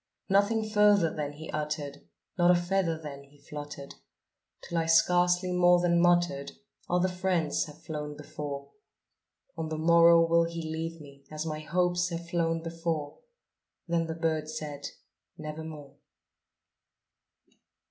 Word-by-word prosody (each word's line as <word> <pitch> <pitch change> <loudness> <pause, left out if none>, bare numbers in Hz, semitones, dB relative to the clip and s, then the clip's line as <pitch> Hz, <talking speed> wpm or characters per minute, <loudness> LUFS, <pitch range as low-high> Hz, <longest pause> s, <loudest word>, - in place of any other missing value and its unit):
Nothing 210 +3 +2
further 210 -5 +4
then 145 -1 -4
he 155 +2 -9
uttered 150 -2 -4 0.3
not 175 -1 +4
a 180 - +7
feather 175 -2 0
then 140 -3 -8
he 140 +1 -22
fluttered 145 -1 -8 0.7
Till 170 - -2
I 165 - -1
scarcely 175 +2 +3
more 180 0 +5
than 170 -1 +3
muttered 175 - +2 0.4
"Other 180 +1 +2
friends 180 -4 0
have 150 0 -14
flown 150 -2 -5
before 145 -2 -7 0.8
On 160 -1 -4
the 155 - -3
morrow 170 +1 +6
will 170 0 +3
he 170 0 -5
leave 165 +1 -4
me, 140 -2 -14
as 155 +1 -5
my 155 -1 -3
hopes 175 +2 0
have 170 0 -5
flown 165 -1 0
before." 165 -3 -3 0.7
Then 165 -1 0
the 160 - -4
bird 160 -2 -1
said, 150 -2 -5 0.5
"Nevermore." 155 -2 -8
165 Hz, 135 wpm, -29 LUFS, 150-175 Hz, 0.8 s, a